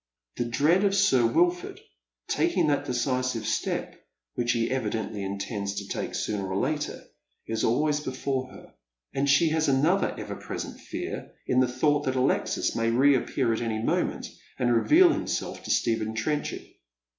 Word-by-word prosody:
The 120 - 0
dread 150 - +2
of 200 -1 +2
Sir 135 - +4
Wilford 175 +8 +1 0.5
taking - - +1
that 145 -2 +1
decisive 125 -2 -1
step, - - -2 0.3
which 120 0 0
he 115 0 0
evidently 110 -4 -2
intends 100 +1 -3
to 100 -1 -5
take - - -4
sooner 100 -3 -2
or 95 - -1
later, 150 +6 -2 0.4
is 115 0 -2
always 150 +6 +2
before 130 -1 -3
her; - - -14 0.4
and 140 +1 0
she 150 +4 +5
has 160 0 +1
another 150 +8 +2
ever - - -5
present - - -6
fear - - -6
in 130 - +2
the 130 - +4
thought 145 +4 +1
tliat 130 - 0
Alexis 130 +1 +1
may 115 0 +1
reappear 130 -1 +2
at 110 - -2
any 115 -2 -1
moment, 110 - -1 0.3
and 120 -1 +2
reveal 330 - +6
himself - - -3
to - - -7
Stephen 110 -1 0
Trenchard. 150 +6 -2
130 Hz, 155 wpm, -27 LUFS, 115-145 Hz, 0.5 s, reveal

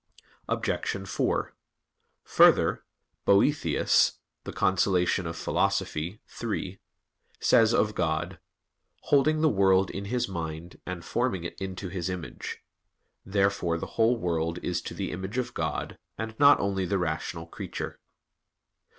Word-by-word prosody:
Obj. 95 0 -2
4: 85 - -1 0.7
Further, - - +4 0.4
Boethius 120 +9 +3 0.3
(De - - -5
Consol. 95 0 +2 0.8
iii) 85 +8 -5 1.2
says 110 -1 +5
of 110 -2 +2
God: 80 -4 -1 0.6
"Holding 155 +2 +3
the 160 - +5
world 95 -5 +3
in 100 +1 -5
His 120 +4 -1
mind, 85 -2 -6
and 90 -2 -5
forming 120 -8 -1
it 85 - -7
into 95 0 -5
His 90 0 -3
image." 90 -3 -6 0.6
Therefore 95 -3 +1
the - - -4
whole 115 +2 +3
world 85 -4 -1
is 90 -1 -1
to - - -7
the - - -3
image 95 +6 -5
of 125 -2 -2
God, - - -3 0.2
and 110 0 -4
not 145 0 +7
only 95 -2 -1
the 100 - +1
rational 80 -1 -3
creature. 80 - -6
95 Hz, 120 wpm, -28 LUFS, 85-110 Hz, 1.2 s, not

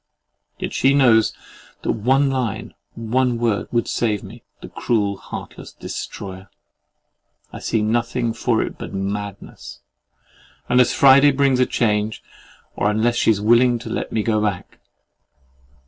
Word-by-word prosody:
—Yet - - -5
she 135 +1 +3
knows 115 -6 +4 0.5
that - - 0
one 135 +5 +2
line, 125 -6 -3 0.2
one 120 +2 0
word 115 -3 -1
would 120 -1 0
save 105 -4 -1
me, 110 +5 -11 0.2
the - - -9
cruel, 105 -4 -1
heartless - - -9
destroyer! 95 0 -8 1.0
I - - -7
see 110 - -1
nothing 120 +1 -1
for 115 -1 0
it - - -7
but - - -7
madness, 100 +1 -6 0.9
unless 125 0 +4
Friday 140 +1 +6
brings 135 -2 +2
a 125 - +3
change, 105 -1 -1 0.5
or 105 - +1
unless 110 +3 +1
she - - +2
is 105 -3 +3
willing 120 +3 +4
to 115 -1 -8
let - - -3
me 110 - -1
go 110 -1 +1
back. 105 -4 -3
115 Hz, 140 wpm, -21 LUFS, 105-125 Hz, 1.0 s, Friday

